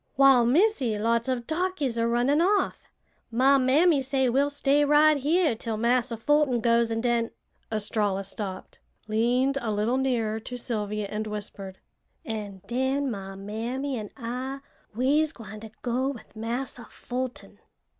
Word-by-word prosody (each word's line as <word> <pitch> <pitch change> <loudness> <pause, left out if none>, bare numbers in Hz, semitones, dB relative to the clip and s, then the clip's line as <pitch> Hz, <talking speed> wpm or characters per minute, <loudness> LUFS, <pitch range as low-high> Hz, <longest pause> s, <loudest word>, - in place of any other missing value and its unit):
"Wal, 265 -3 +6
Missy, 275 - +2
lots 230 +3 +1
of 245 -2 -1
darkies 315 -5 -1
are 230 0 +1
runnin' 250 +6 +2
off! 400 +4 +1 0.4
My 265 +4 +4
mammy 285 +4 +4
say 265 -1 +1
we'll 275 +4 +2
stay 285 0 +2
right 300 +1 +5
here 305 +2 +2
'til 225 0 -4
Massa 235 +1 +1
Fulton 290 0 +2
goes, 235 0 +2
an' 225 0 -1
den" 235 -1 +1 0.4
Estralla 205 -2 -1
stopped, 195 -1 -7 0.3
leaned 245 +5 +1
a 225 - -2
little 215 +5 +1
nearer 230 -5 0
to 245 +3 -7
Sylvia 210 -3 -3
and 215 +2 -4
whispered, 200 -2 -6 0.5
"an' 205 -4 -6
den 265 +2 0
my 195 -2 -6
mammy 235 +8 -4
an' 215 -3 -5
I 260 +3 -4 0.3
we'se 290 +6 +2
gwine 215 -4 -10
to 220 +1 -9
go 255 +2 0
with 255 -5 -9
Massa 235 +2 -4
Fulton." 250 0 -6
245 Hz, 145 wpm, -26 LUFS, 220-275 Hz, 0.5 s, Wal